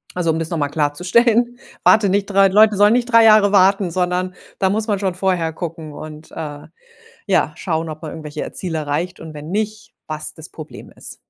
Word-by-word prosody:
Also, 175 -2 -1
um 160 - -2
das 165 0 -2
noch 170 - -2
mal 145 -1 -1
klarzustellen, 220 - +1 0.2
warte 210 -2 +5
nicht 200 +1 0
3 195 -1 +4
Leute 210 +1 +4
sollen 205 +2 +5
nicht 245 0 0
3 230 0 +6
Jahre 215 -2 +6
warten, 195 -1 +3
sondern 180 +1 -1 0.3
da 190 -1 +2
muss 215 +3 -1
man 205 -2 +1
schon 190 -3 -1
vorher 180 -3 0
gucken 165 -2 -7
und, 155 +1 -10
äh, 145 -2 -7 0.6
ja, - - +1
schauen, 165 -2 -3
ob 155 0 -8
man 155 - -6
irgendwelche 150 -1 -6
Ziele 170 -4 -2
erreicht 155 +5 -3
und 160 -1 -9
wenn 150 +2 -9
nicht, 215 +1 -3
was 155 0 -4
das 160 +1 -8
Problem 155 -1 -11
ist. - - -10
180 Hz, 200 wpm, -19 LUFS, 155-205 Hz, 0.6 s, 3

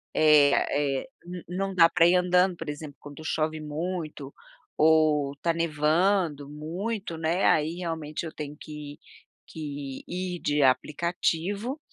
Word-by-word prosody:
Eh 150 -2 +6 0.5
eh, - - -15 0.4
não 195 +2 -2
não 190 - -7
dá 165 -1 +7
pra 170 -1 +4
ir 180 - +4
andando, 180 0 +3
por 165 -2 -6
exemplo, 145 -1 -7
quando 145 +1 -11
chove 155 0 -1
muito 155 -2 -5 0.4
ou 155 -3 +3
tá 170 - 0
nevando 165 0 +1
muito, 170 +5 -4
né, 165 +4 0
aí, 155 +2 +2
realmente, 165 -2 -4
eu 160 - -6
tenho 150 -1 -6
que 150 -2 -9 0.5
que 145 -3 -6
ir 180 -1 -4
de 145 0 +1
aplicativo 175 - 0
160 Hz, 135 wpm, -27 LUFS, 150-180 Hz, 0.5 s, dá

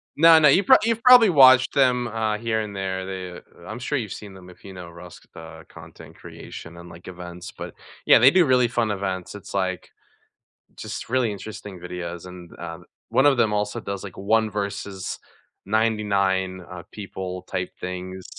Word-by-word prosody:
No, 165 +1 +7
no, 150 - +5
you've 185 +8 +4
prob 260 - +7
you've 230 0 -1
probably 250 -4 +8
watched 130 -4 +6
them, 125 -3 +2
uh, 110 -1 -2
here 110 -1 -1
and 105 -2 -7
there, 95 -1 -3
they 95 -2 -7 0.3
I'm 110 +2 -6
sure 145 +4 -2
you've 110 -6 -4
seen 100 -2 -10
them 90 -1 -14
if 90 - -18
you 95 - -10
know 90 -2 -10
Rust, 85 0 -14
uh, 80 -1 -11
content - - -14
creation 85 +1 -11
and, 85 0 -12
like, 85 +2 -14
events, 90 -1 -9
but, - - -9 0.3
yeah, - - +7
they 130 +4 +7
do 180 -3 +4
really 125 -2 +3
fun 115 -2 -1
events, 95 -1 -4
it's, 100 - -11
like, 95 -2 -2 0.9
just - - -7
really 125 -3 +1
interesting 100 -2 -9
videos, 90 0 -7
and, 90 -1 -12
um, 85 +1 -8 0.2
one 135 - +3
of 140 -3 +4
them 110 -2 +2
also 105 0 -2
does, 100 0 -6
like, 95 - -9
one 110 +2 +1
versus 100 -2 -5 0.5
99, 100 -4 0
uh, 90 -1 -8
people 95 -3 -7
type 90 0 -4
things. 90 0 -6
100 Hz, 185 wpm, -23 LUFS, 90-115 Hz, 0.9 s, probably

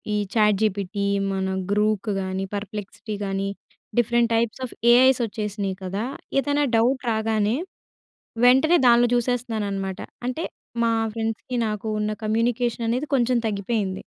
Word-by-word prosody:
ఈ - - +1 0.2
చాట్‌జిపిటి 205 -2 +1 0.3
మన 190 0 -1 0.3
గ్రూక్ 210 0 +1
గానీ, 190 +1 -3
పర్‌ప్లెక్సీటీ 210 +1 -6
గానీ, 195 0 -1 0.5
డిఫరెంట్ 235 0 +2
టైప్స్ 230 +2 0
ఆఫ్ - - -13 0.2
ఏఐసొచ్చేసినియి 215 -6 +2
కదా! 195 +5 -3 0.3
ఏదన్నా 290 +1 +1
డౌట్ 255 +3 +2
రాగానే, 220 +1 +1 0.9
వెంటనే 265 +7 +6
దానిలో 240 0 +6
జుసేస్తున్నాననమాట. 220 -6 -1 0.3
అంటే 255 +7 -2 0.4
మా 230 - +2 0.2
ఫ్రెండ్స్‌కీ 225 +2 -3
నాకు 210 0 -4
ఉన్న 210 0 -1
కమ్యూనికేషననేది 235 +3 0
కొంచెం 250 -1 +2
తగ్గిపోయింది. 200 -2 -2
220 Hz, 110 wpm, -24 LUFS, 205-240 Hz, 0.9 s, వెంటనే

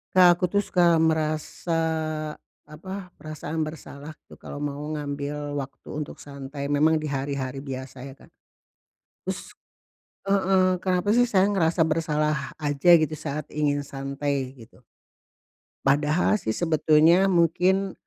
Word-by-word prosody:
Kak, 175 -1 +7
aku 185 - -1
tuh, 205 +3 +1
suka 175 -3 +3
merasa, 160 +1 -1 1.0
apa, 185 +4 -8
perasaan 155 +1 -4
bersalah 155 -1 -9 0.2
tuh, - - -13
kalau 145 - -8
mau 145 -1 -3 0.2
ngambil 145 0 -4
waktu 135 -1 -8
untuk 150 0 -6
santai 140 0 -6
memang 155 +2 +3
di 155 - -3
hari-hari 135 -1 -3
biasa 130 -1 -7
ya, 135 - -9
Kak. - - -20 0.9
Terus - - -6 0.8
heeh, 185 -2 +3
kenapa 185 +2 +1
sih 245 +2 +4
saya 200 -2 +3
ngerasa 170 -3 +2
bersalah 155 -2 -1
aja, 145 +2 0
gitu, 155 -1 +1
saat 150 -1 -5
ingin 145 -1 0
santai, 140 -1 -3
gitu? 115 -2 -16 1.1
Padahal 150 +9 +2
sih, 110 - -2
sebetulnya 165 +3 +4
mungkin, 185 +2 +2
155 Hz, 125 wpm, -25 LUFS, 140-175 Hz, 1.1 s, Kak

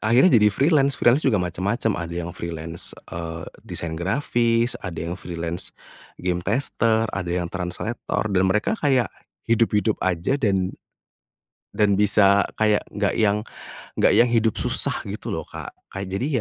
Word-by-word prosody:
akhirnya 120 +11 +5
jadi 105 - +6
freelance, 140 - +2
freelance 120 +5 +4
juga 130 -8 +2
macam-macam 100 +6 -1
ada 85 0 -5
yang 85 - -6
freelance, 85 0 -6 0.2
eee, 80 -1 -5 0.2
desain 85 -1 -3
grafis 115 - +1
ada 90 -4 -6
yang 85 +1 -3
freelance 85 -1 -5 0.4
game 90 -1 -1
tester, 110 +2 +1
ada 90 -3 -3
yang 85 0 -2
translator, 95 +6 -3
dan 95 -1 +3
mereka 105 - +1
kayak, 130 -5 +2 0.3
hidup-hidup 110 -2 +2
saja 95 +9 0
dan, 95 -6 +1 1.0
dan 105 -2 +3
bisa 100 0 +4 0.2
kayak 105 -1 +3
nggak 100 -1 0
yang 105 -1 +2 0.5
nggak - - +5
yang 120 - +5
hidup 115 -2 +2
susah - - +1 0.2
gitu - - -5
loh, - - -3
Kak, - - -8 0.2
kayak 95 0 -5
jadi 110 +7 -1
100 Hz, 145 wpm, -23 LUFS, 90-115 Hz, 1.0 s, jadi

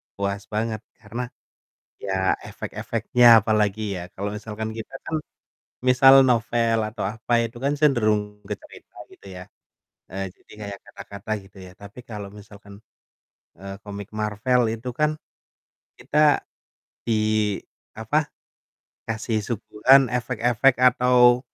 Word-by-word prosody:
puas 100 0 -3
banget 110 0 -2 0.2
karena 115 +3 -6 0.8
ya 95 -1 0 0.2
efek-efeknya 125 0 0 0.2
apalagi 105 0 +1 0.2
ya, - - -6
kalau 100 +2 -4
misalkan 110 +1 -5
kita 110 - -8
kan, 160 - -2 0.7
misal 130 +1 +7 0.2
novel 115 -1 +1
atau 110 -1 -6
apa, 115 +2 -4
itu 115 +1 -9
kan 140 +1 +1
cenderung 110 -8 +1
bercerita - - -10 0.2
gitu - - -16
ya 90 - -8 0.7
heeh, 95 +1 -4
jadi - - -24
kayak 100 -1 -7
kata-kata 100 +1 -10
gitu 95 +1 -19
ya, 90 - -12
tapi 100 +4 -11
kalau 105 -4 -7
misalkan, 100 0 -15 0.8
eee, 95 0 -7
komik 100 -1 -8
Marvel 110 +4 +1
itu 115 +3 -6
kan 150 0 +1 0.8
kita 150 0 +3 0.6
di, 115 - -1 0.8
apa, 145 +8 -1 0.8
kasih 110 0 -1
suguhan 115 +4 +4
efek-efek 125 +1 +2
atau, 125 0 +4
110 Hz, 115 wpm, -23 LUFS, 105-125 Hz, 0.8 s, misal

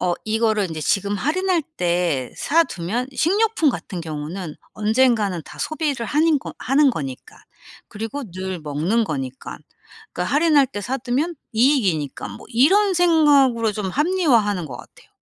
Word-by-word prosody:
'어 180 -1 +1
이거를 215 -4 +1
이제 155 -1 -5
지금 200 +5 0
할인할 345 - 0
때 170 -7 0
사 330 +3 +3
두면 210 - -3
식료품 400 - +2
같은 185 -6 -6
경우는 160 +1 -6 0.2
언젠가는 215 -5 +1
다 - - -13
소비를 295 -7 -2
하는 305 0 +2
거 - - -9
하는 275 +1 +3
거니까 135 - -7 0.5
그리고 225 +6 -5
늘 185 0 -5
먹는 160 +10 0
거니까. 135 -6 -5 0.5
그러니까 180 +9 -2
할인할 300 -3 +4
때 205 - -6
사두면 265 - -2 0.2
이익이니까.' 210 - +1
뭐 100 - -11
이런 380 - +4
생각으로 285 -10 +4
좀 195 -2 -3
합리화하는 255 - +2
것 125 -3 -8
같아요. - - -16
225 Hz, 320 characters per minute, -21 LUFS, 180-295 Hz, 0.5 s, 할인할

